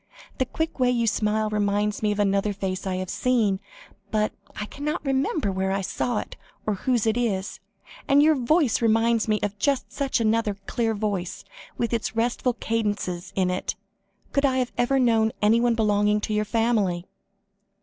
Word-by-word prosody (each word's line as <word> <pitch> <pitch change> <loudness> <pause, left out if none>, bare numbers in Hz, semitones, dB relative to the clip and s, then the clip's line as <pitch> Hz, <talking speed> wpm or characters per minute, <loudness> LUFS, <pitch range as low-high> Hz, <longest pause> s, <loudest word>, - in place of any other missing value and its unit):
The 260 - +1
quick 320 0 -3
way 250 -1 +4
you 240 -2 +1
smile, 215 0 +1
reminds 205 0 0
me 210 -1 +2
of 205 - -2
another 200 0 +1
face 190 -1 -3
I 185 - -1
have 185 -1 -4
seen, 225 -7 +1 0.5
but 215 -1 0 0.3
I 210 - -2
cannot 300 +8 -4
remember 270 -3 0
where 190 0 -1
I 195 0 0
saw 230 +4 -1
it, - - -5 0.3
or 215 - +1
whose 235 +3 0
it 220 +1 +2
is. 205 -5 -1 0.5
And 285 +1 +5
your 315 +1 +6
voice 275 -1 +2
reminds 225 0 +3
me 215 -1 +2
of 205 0 -2
just 280 +3 0
such 275 -3 0
another 220 -2 +1
clear 225 -2 0
voice, 200 -4 -3 0.3
with 230 -1 -1
restful 240 +2 +1
cadences 205 -6 -2
in 185 -2 +1
it. 180 - -2 0.6
Could 280 - +1
I 260 -2 +2
ever 245 +3 +1
have 265 - +3
known 225 -2 +3
anyone 230 +3 +3
belonging 210 -1 +2
to 215 - -2
your 210 0 +1
family?" 210 -6 +1
220 Hz, 170 wpm, -25 LUFS, 205-245 Hz, 0.6 s, your